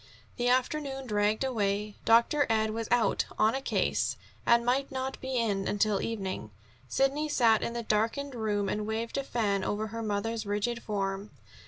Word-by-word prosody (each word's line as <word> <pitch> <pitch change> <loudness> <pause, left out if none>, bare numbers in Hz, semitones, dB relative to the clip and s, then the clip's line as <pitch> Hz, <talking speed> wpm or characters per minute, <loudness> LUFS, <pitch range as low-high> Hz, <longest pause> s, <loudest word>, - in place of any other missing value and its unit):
The 245 -1 0
afternoon 270 +1 0
dragged 210 0 +1
away. 210 -4 -1
Dr. 235 +6 +4
Ed 220 -1 +2
was 225 0 -3
out 240 -2 +2
"on 220 +1 +4
a 270 - -2
case" - - 0 0.3
and 235 0 +5
might 270 +3 +1
not 265 0 -4
be 260 -1 -2
in 200 -5 0
until 205 -1 +1
evening. 195 - -3 0.4
Sidney 280 +3 +1
sat 230 -6 +4
in 235 - -2
the 235 0 -3
darkened 225 +7 0
room 210 -4 -1
and 210 +2 -2
waved 225 +4 -2
a - - -2
fan 205 -7 0
over 215 +2 -2
her 230 +2 -5
mother's 220 +1 -2
rigid 210 +3 -1
form. 195 -1 -3
225 Hz, 170 wpm, -29 LUFS, 210-250 Hz, 0.4 s, and